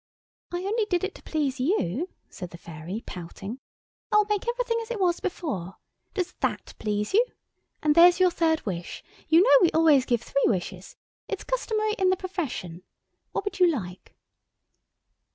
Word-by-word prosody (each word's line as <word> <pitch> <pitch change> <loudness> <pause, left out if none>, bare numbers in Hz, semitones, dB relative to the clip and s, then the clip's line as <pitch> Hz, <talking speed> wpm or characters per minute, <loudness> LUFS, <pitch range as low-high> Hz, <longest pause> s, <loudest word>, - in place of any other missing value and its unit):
"I 350 +1 -3
only 435 +2 +1
did 355 -3 0
it 385 - -2
to - - -14
please 285 -4 -2
you," 285 - 0 0.2
said 180 -3 -8
the 170 - -11
Fairy 170 +6 -7
pouting. 195 +7 -7 0.5
"I'll 425 0 +5
make 420 +1 -1
everything 480 -1 0
as 450 - -8
it 475 -3 -3
was 355 -3 +2
before. 210 - -4 0.4
Does 365 -2 -2
that - - -2
please 210 - -2
you? 445 +4 +6 0.6
And 300 -1 +4
there's 350 +3 +7
your 365 -1 +5
third 320 -2 +1
wish. 175 -4 -5 0.2
You 325 +3 +6
know 285 -7 +7
we 345 - +6
always 310 -5 +5
give 240 -2 +1
three 275 - +1
wishes. 185 -1 -3 0.3
It's - - -4
customary 435 -4 -1
in 375 -1 +4
the 375 - +2
profession. 300 - -4 0.5
What - - -3
would 405 - -4
you 360 - +7
like?" 190 - -5
325 Hz, 170 wpm, -26 LUFS, -, 0.6 s, there's